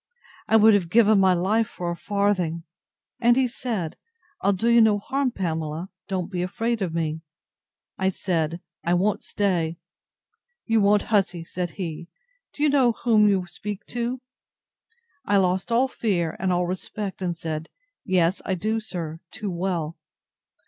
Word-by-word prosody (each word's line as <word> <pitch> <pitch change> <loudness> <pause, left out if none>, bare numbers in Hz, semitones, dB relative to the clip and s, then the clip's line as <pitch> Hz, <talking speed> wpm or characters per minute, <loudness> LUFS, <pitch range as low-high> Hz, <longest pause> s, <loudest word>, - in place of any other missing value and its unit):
I - - +3
would 220 0 +7
have 190 -5 +2
given 215 0 +5
my 190 -1 +5
life 210 +6 +1
for 175 -1 -4
a - - -3
farthing. 185 -4 0 0.6
And 240 +1 +4
he 265 -1 +3
said, 225 -9 -4 0.4
I'll 200 - +3
do 200 +4 -1
you 235 0 +6
no 215 -2 +5
harm, 270 +6 -1
Pamela; 165 -4 -3 0.2
don't 185 -2 -3
be 180 -2 -2
afraid 225 +5 -1
of 185 -4 -1
me. 160 -1 -2 0.8
I 190 0 +2
said, 170 -3 -1 0.2
I 175 +1 +2
won't 195 +3 +1
stay. 170 -5 -1 0.9
You 225 -2 +3
won't, 205 0 +4
hussy! 190 -4 +2
said 175 +1 -4
he: 170 -3 -5 0.4
Do 295 - -4
you 300 - +5
know 265 -4 +4
whom 215 -2 +4
you 190 -3 +1
speak 200 +4 -7
to? 245 +1 -2 1.0
I 205 -5 +2
lost 190 +3 +1
all 245 +3 +4
fear, 180 -10 -1
and 190 0 0
all 180 0 +1
respect, 190 +2 -4
and 175 -2 -2
said, 160 -1 -4 0.3
Yes, 185 -2 +2
I 190 - -1
do, 215 +5 -1
sir, 165 -7 -5
too 210 -1 -5
well! 170 -3 -2
190 Hz, 160 wpm, -24 LUFS, 175-220 Hz, 1.0 s, would